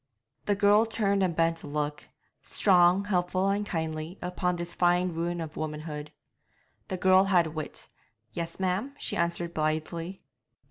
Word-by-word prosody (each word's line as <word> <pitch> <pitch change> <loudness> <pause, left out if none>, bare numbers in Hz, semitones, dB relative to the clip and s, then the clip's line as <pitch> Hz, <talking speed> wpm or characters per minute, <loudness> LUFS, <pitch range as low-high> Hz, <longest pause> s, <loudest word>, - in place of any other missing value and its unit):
The 205 - +2
girl 205 +3 +4
turned 200 -3 +1
and 180 -3 +1
bent 165 0 +1
a - - -9
look 150 0 -3 0.3
strong, 180 0 +4
helpful, 185 0 +1
and 200 +1 0
kindly 160 -2 -4
upon 180 0 -1
this 175 0 -5
fine 180 +1 +2
ruin 170 +1 -2
of 160 -2 -6
womanhood. 150 -1 -5 0.8
The 185 - -3
girl 185 +1 +5
had 175 -5 +2
wit 155 -2 -5 0.4
'Yes, 170 +8 -5
ma'am?' 190 +9 -1
she - - -3
answered 170 0 -1
blithely. 160 +4 -2
175 Hz, 145 wpm, -28 LUFS, 160-190 Hz, 0.8 s, girl